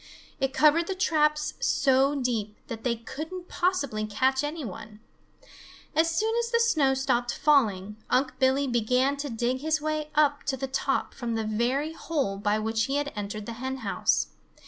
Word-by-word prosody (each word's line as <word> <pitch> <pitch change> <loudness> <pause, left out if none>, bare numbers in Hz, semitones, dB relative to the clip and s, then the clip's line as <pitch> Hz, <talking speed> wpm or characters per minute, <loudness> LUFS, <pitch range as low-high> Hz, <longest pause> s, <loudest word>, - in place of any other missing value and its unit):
It 270 -1 0
covered 310 +4 +4
the 385 - -2
traps 300 -4 +1
so 270 +1 +3
deep 230 -6 -2
that 225 -1 -6
they 245 -2 +1
couldn't 315 +10 -7
possibly 280 - -1
catch 265 +6 +1
any 295 0 -3
one. 210 +1 -9 1.0
As 325 +1 +4
soon 435 +7 0
as 470 0 -1
the 465 -1 +2
snow 305 -13 +3
stopped 245 -2 0
falling, 210 -9 +2
Unc' 260 0 +1
Billy 265 +2 +3
began 250 +3 +1
to 285 0 -4
dig 240 +2 -1
his 315 +2 0
way 305 0 -2
up 290 -1 +3
to 270 -2 -1
the 270 - -2
top 270 0 -1
from 235 -2 -3
the 225 - -1
very 250 +8 0
hole 280 -12 -2
by 205 +1 +1
which 220 +1 0
he 275 - -2
had 290 0 -1
entered 205 0 -5
the 230 - -5
hen 265 0 -3
house. 195 - +1
265 Hz, 175 wpm, -27 LUFS, 230-300 Hz, 1.0 s, covered